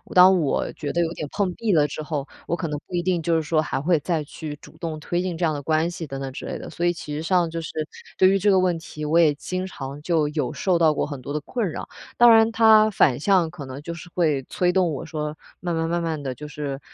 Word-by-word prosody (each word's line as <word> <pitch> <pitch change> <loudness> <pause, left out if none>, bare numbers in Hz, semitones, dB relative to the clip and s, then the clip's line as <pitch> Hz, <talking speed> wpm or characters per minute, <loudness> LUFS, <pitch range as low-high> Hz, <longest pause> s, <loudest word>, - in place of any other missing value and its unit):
当 185 0 +8
我 150 -4 0
觉 145 -2 -5
得 175 - +2
有 165 -1 0
点 150 - -4
碰 195 -3 0
壁 220 -4 0
了 150 -2 +4
之 150 - -5
后， 150 -2 -3 0.2
我 170 - 0
可 165 -3 -3
能 150 - -3
不 - - -14
一 175 - 0
定 180 -2 +1
就 165 0 +1
是 160 - +2
说 155 +1 +1
还 135 -3 -2
会 165 0 +2
再 160 0 -1
去 150 +1 -7
主 - - -15
动 160 -2 -4
推 175 +3 -1
进 180 -3 -3
这 175 - -3
样 160 - +2
的 145 - -4
关 160 +3 +1
系， 170 -3 -6
等 135 0 -6
等 135 -1 -4
之 - - -7
类 - - -4
的。 - - -8
所 175 - -3
以 175 - +3
其 150 -3 -7
实 150 - -3
上 175 0 +2
就 165 0 -4
是 160 - -6 0.5
对 185 - +6
于 195 +1 +3
这 205 +2 +3
个 190 - +5
问 180 -2 +2
题， 155 -1 -8
我 155 +3 +3
也 155 -3 +5
经 185 +4 -4
常 140 -4 -7
就 155 -2 +1
有 150 0 -2
受 180 -3 +1
到 160 -2 +5
过 - - -1
很 145 -3 -7
多 140 +3 -6
的 150 - -2
困 215 - -2
扰。 - - -6 0.3
当 240 -1 +7
然 225 0 +6
它 220 -1 +6
反 145 - +3
向 180 -1 +3
可 160 -4 -9
能 130 +2 -8
就 170 +2 -6
是 170 +1 -10
会 155 -6 +2
催 180 +5 0
动 180 -4 +2
我 145 - -5
说， 150 -1 -4 0.2
慢 175 -1 -2
慢 165 0 -1
慢 170 0 0
慢 160 -3 -2
地 130 -1 -3
就 150 - -7
是 140 -2 -5
165 Hz, 305 characters per minute, -24 LUFS, 150-180 Hz, 0.5 s, 当